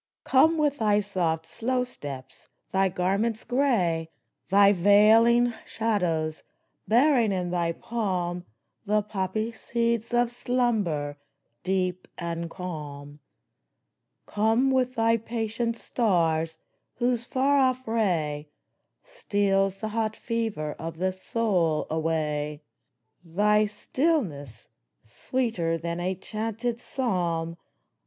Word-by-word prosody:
Come 320 +5 +4
with 295 -2 +1
thy 210 -2 +3
soft, 175 -6 -1
slow 250 +8 -1
steps, 140 - -9 0.2
thy 190 0 +2
garments 195 +5 0
gray, 205 - +1 0.4
Thy 200 +1 +6
veiling 220 +5 +5
shadows, 170 -8 -1 0.5
bearing 240 -1 +4
in 180 -2 -2
thy 170 -1 0
palm 180 -6 -2 0.4
The 210 0 +2
poppy 210 +2 -2
seeds 235 0 -1
of 240 0 +2
slumber, 215 - -1 0.4
deep 185 -1 -1
and 170 -1 -4
calm! 150 -5 -7 1.1
Come 225 +5 +2
with 255 -1 +1
thy 230 0 +3
patient 230 +1 -2
stars, 165 -10 0 0.4
whose 240 -1 0
far 275 +3 +2
off 255 -1 +1
ray 160 -10 0 0.5
Steals 195 -2 0
the 215 +2 -5
hot 220 0 -1
fever 225 -12 -2
of 165 0 -6
the 185 +2 0
soul 185 -6 0
away. 150 -2 -1 0.6
Thy 210 +5 +2
stillness, 205 - -2 0.4
sweeter 170 - -2
than 170 +1 -4
a 185 +2 -1
chanted 225 +4 -3
psalm 170 -11 -1
205 Hz, 105 wpm, -26 LUFS, 170-230 Hz, 1.1 s, Thy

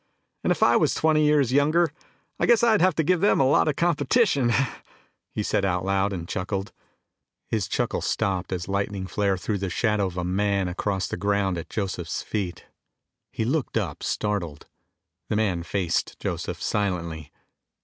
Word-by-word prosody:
"And - - +1
if - - +2
I 120 - +5
was 155 - +2
twenty 155 -1 +3
years 145 -4 +3
younger 155 +4 +3 0.5
I - - +2
guess 235 -1 +5
I'd 225 -3 +5
try 185 - +5
to 160 -2 0
give 180 +3 +2
them 205 - +4
a - - +5
lot 140 - +4
of 150 - +1
competition!" 160 - +2 0.8
he - - -2
said - - 0
aloud 95 +1 +1
and 85 -3 -5
chuckled. 95 +2 -3 0.8
His 110 -5 0
chuckle - - -1
stopped 95 -2 -1
as 90 -2 -3
lightning 100 -1 -2
flare 100 +1 0
threw 100 +3 -2
the 95 0 -2
shadow 105 +1 +1
of 90 0 -8
a 90 - -1
man 100 +1 0
across 95 +1 -2
the - - -4
ground 100 -1 +1
at 85 - -9
Joseph's 95 -5 -3
feet. 95 -6 -4 0.7
He 110 - -2
looked 135 -1 -1
up, 90 -9 -3
startled. 95 -8 -2 0.6
The - - 0
man 100 -5 +1
faced 90 +1 -1
Joseph - - -4
silently. 85 -7 -2
100 Hz, 170 wpm, -25 LUFS, 90-135 Hz, 0.8 s, I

